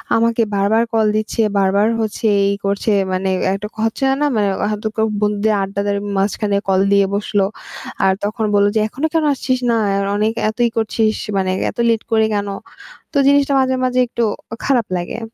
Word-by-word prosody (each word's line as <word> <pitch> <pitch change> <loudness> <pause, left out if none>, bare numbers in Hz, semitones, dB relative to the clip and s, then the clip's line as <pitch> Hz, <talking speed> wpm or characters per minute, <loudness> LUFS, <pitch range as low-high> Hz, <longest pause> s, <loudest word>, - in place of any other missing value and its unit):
আমাকে 230 0 +2
বারবার 210 +4 +2
কল 220 -1 +3
দিচ্ছে 215 +1 -1 0.2
বারবার 200 +2 +2
হচ্ছে 220 +1 -3 0.2
এই 200 - +1
করছে 200 +2 0 0.2
মানে 190 +1 -1 0.2
একটা 200 +2 -4
হচ্ছে 225 +5 -1 0.2
না, - - +3
মানে 205 -2 +2 0.2
এখন 210 0 -2
তো - - 0
ক - - -27 0.2
বন্ধুদের 210 +1 +1
আড্ডাদের 200 +1 -2 0.2
মাঝখানে 200 +1 0
কল 190 0 +3
দিয়ে 200 -1 +4
বসল। 205 0 -1 0.7
আর 190 - +4
তখন 215 +1 -2
বললো 205 0 +4
যে 220 - +3
"এখনো 280 +8 -2
কেন 325 -1 +2
আসছিস 255 -1 -1
না? - - +2 0.2
আর 200 0 0
অনেক 215 +2 +1 0.2
এত 220 - -7
ই - - -2
করছিস 220 0 +1 0.2
মানে 185 -1 0 0.2
এত - - -25
লেট 225 -1 +1
করে 220 -1 +3
কেন?" 205 0 -1 0.7
তো - - -6
জিনিসটা 285 0 +3
মাঝে, 260 0 +1
মাঝে 255 0 0
একটু 235 0 -1 0.4
খারাপ 250 -5 +2
লাগে 175 +6 -5
215 Hz, 185 wpm, -18 LUFS, 200-230 Hz, 0.7 s, দিয়ে